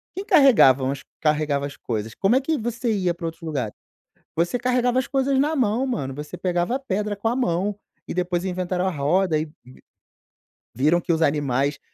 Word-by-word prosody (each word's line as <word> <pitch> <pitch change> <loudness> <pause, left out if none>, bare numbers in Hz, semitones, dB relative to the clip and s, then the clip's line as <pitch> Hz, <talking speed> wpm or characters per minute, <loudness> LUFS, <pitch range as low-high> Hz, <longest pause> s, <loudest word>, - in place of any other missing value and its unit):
Quem 385 +2 -4
carregavam 140 - +5
os 140 0 -6 0.2
carregava 150 -2 +1
as 140 - -11
coisas? 110 -1 -4
Como 200 +5 +2
é 265 - +3
que 310 +2 0
você 235 +1 -2
ia 185 -4 0
pra 170 0 -7
outros 165 - -8
lugares? 140 -9 -3 0.6
Você 175 +8 +1
carregava 250 0 +2
as 260 - -2
coisas 270 0 +1
na 300 +3 +1
mão, 245 -1 +1
mano. 140 - -3
Você 150 +1 -7
pegava 180 +5 0
a - - -1
pedra 210 -5 -2
com 205 +3 -3
a 235 - +1
mão 205 -4 0 0.3
e - - -4
depois 180 -1 -1
inventaram 185 0 -1
a - - 0
roda 160 +3 +1
e 155 - -2
v 155 - -17 1.2
viram 155 +8 +3
que 170 - -1
os 160 - -1
animais 140 -1 0
180 Hz, 195 wpm, -23 LUFS, 150-240 Hz, 1.2 s, carregavam